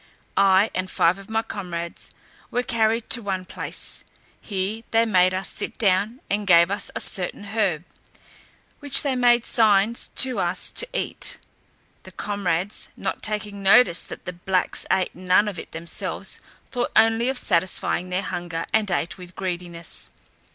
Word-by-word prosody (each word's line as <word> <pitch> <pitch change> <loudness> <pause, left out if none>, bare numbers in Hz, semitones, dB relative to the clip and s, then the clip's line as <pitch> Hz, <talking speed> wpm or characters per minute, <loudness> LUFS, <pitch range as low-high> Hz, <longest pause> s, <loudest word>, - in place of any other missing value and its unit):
I, 195 +2 +4
and 185 0 -2
five 175 +3 +2
of 195 - -13
my 220 0 0
comrades, 175 -6 -6 0.4
were 245 - -1
carried 225 -1 0
to 235 - +3
one 190 -3 -3
place; - - -3 0.4
here 200 +2 -3
they 225 0 +3
made 185 -4 +4
us 185 +1 -2
sit - - -4
down, 210 +4 +1
and 205 0 -1
gave 170 0 +6
us 200 0 -2
a - - -2
certain 185 +2 -2
herb, 200 -6 -1 1.0
which 285 -2 +7
they 275 -3 0
made 240 -1 +4
signs 215 0 +3
to 255 -5 +3
us 175 0 0
to - - -1
eat. - - -2 0.7
My - - -11
comrades 200 -2 -2
not - - -3
taking 210 -1 -2
notice 195 -2 +5
that - - -10
the 180 - -5
blacks 180 +1 -1
ate 190 -1 +1
none 185 +3 +2
of 195 -5 -4
it - - -9
themselves, 165 +1 -2 0.3
thought 245 -2 -1
only 225 +2 +4
of 265 - -2
satisfying 180 -2 +1
their 185 +2 -1
hunger, 175 -3 -4
and 215 -2 +2
ate 175 0 -2
with 180 -1 -11
greediness. 175 -2 -5
195 Hz, 160 wpm, -23 LUFS, 180-220 Hz, 1.0 s, which